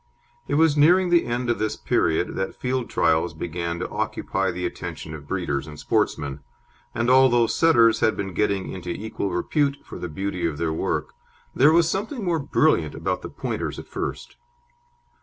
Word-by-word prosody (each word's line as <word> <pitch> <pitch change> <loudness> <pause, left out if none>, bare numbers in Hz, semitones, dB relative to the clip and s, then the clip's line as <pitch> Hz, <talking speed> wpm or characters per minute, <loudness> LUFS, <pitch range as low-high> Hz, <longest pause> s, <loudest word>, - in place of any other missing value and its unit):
It 145 - 0
was 160 -1 +4
nearing 175 +5 +5
the 170 -1 +4
end 120 +1 -2
of 120 - -2
this 110 0 -1
period 80 +2 +1
that 95 0 -3
field 125 -1 -2
trials 80 +1 +1
began 85 +1 -3
to - - -4
occupy 95 -1 -2
the 90 0 -3
attention 80 -2 -6
of 75 -2 -9
breeders 80 -8 -2
and 75 -1 -9
sportsmen, 70 -2 -1 0.6
and 115 - 0
although 125 -2 +5
Setters 115 -5 +4
had 110 - +2
been 95 -2 -4
getting 100 0 0
into 90 -1 -7
equal 100 +2 -3
repute 140 - 0
for - - -9
the 90 - -5
beauty 90 +1 -2
of 75 -3 -4
their 80 0 -1
work, - - -2 0.4
there 145 +4 +5
was 165 0 +4
something 210 - -3
more 170 -2 +1
brilliant 140 - +2
about - - -2
the - - -7
Pointers - - -4
at - - -8
first. - - -5
105 Hz, 175 wpm, -24 LUFS, 85-140 Hz, 0.6 s, nearing